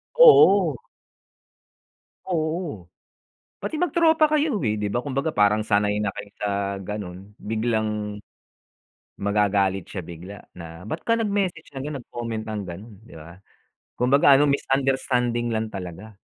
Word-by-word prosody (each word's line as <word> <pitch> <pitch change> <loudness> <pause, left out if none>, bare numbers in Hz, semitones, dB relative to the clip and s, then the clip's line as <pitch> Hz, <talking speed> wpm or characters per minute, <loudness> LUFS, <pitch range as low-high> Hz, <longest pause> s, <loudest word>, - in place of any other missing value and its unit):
Oo. 200 - +7 1.5
Oo. 160 - -2 0.7
Pati - - -4
mag-tropa 320 -1 +3
kayo, 295 - +1
eh. 110 -2 0
Di 105 - -1
ba 120 +4 -1
kumbaga, 140 +2 -2
parang 105 +1 +3
sanay 105 -1 +1
na 105 -1 -1
kayo 100 - -8
sa 105 - -1 0.3
gano'n 95 0 -7
biglang 110 -2 -2 1.0
magagalit 100 -2 +1
siya 95 - -6
bigla 85 +4 -10 0.2
na, 80 0 -9
"Ba't 105 - -6
ka 230 - +3
nag-message 200 -7 -1
ng 135 -2 -7
ganun, 150 - -4
nag-comment 115 -2 -5
ng 105 -1 -3
ganun?" 100 +6 -9
'Di - - -14
ba? 85 +3 -12 0.6
Kumbaga 135 +2 +5
ano, 145 - +4
misunderstanding 130 -3 0
lang 110 -1 -2
talaga. 95 +3 -8
110 Hz, 130 wpm, -24 LUFS, 100-150 Hz, 1.5 s, Oo